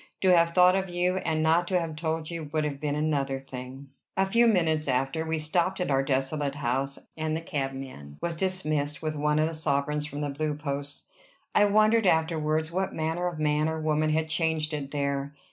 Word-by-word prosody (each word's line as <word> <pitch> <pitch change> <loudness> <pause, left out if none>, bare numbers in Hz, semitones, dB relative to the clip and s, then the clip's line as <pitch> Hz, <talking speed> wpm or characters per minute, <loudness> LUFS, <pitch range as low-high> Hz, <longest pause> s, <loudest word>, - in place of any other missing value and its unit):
To 185 -2 +5
have 170 0 +3
thought 180 0 +6
of 190 -1 -1
you, 180 +1 0
and 160 -4 0
not 165 +2 +3
to 185 -1 +2
have 165 -2 -4
told 160 +1 -3
you, 165 -3 -5
would 155 -1 0
have 145 -2 -3
been 145 -1 -1
another 140 -3 0
thing." 135 +1 -9 0.3
A 190 - +4
few 235 +5 +4
minutes 160 -7 +2
after, 135 +4 0
we 160 0 0
stopped 170 +5 0
at 180 -5 -1
our 135 0 +3
desolate 135 +1 -1
house, 135 0 -1 0.2
and 155 0 -1
the - - -3
cabman 135 - -5
was 170 -1 -2
dismissed 155 -5 0
with 155 -1 -2
one 150 0 +1
of 155 +1 +3
the 165 - -4
sovereigns 150 -1 -1
from 145 -1 -6
the 145 - -1
Blue 150 +1 -2
Posts. 145 -1 -4 0.5
I 205 - +5
wondered 215 +1 +4
afterwards 160 -1 +1
what 190 +2 -2
manner 160 +3 -1
of 175 -3 -4
man 150 0 +1
or 160 0 -3
woman 155 0 +1
had 160 +1 +1
changed 160 -1 0
it 145 -2 -3
there. 140 0 -2
155 Hz, 205 wpm, -27 LUFS, 145-165 Hz, 0.5 s, thought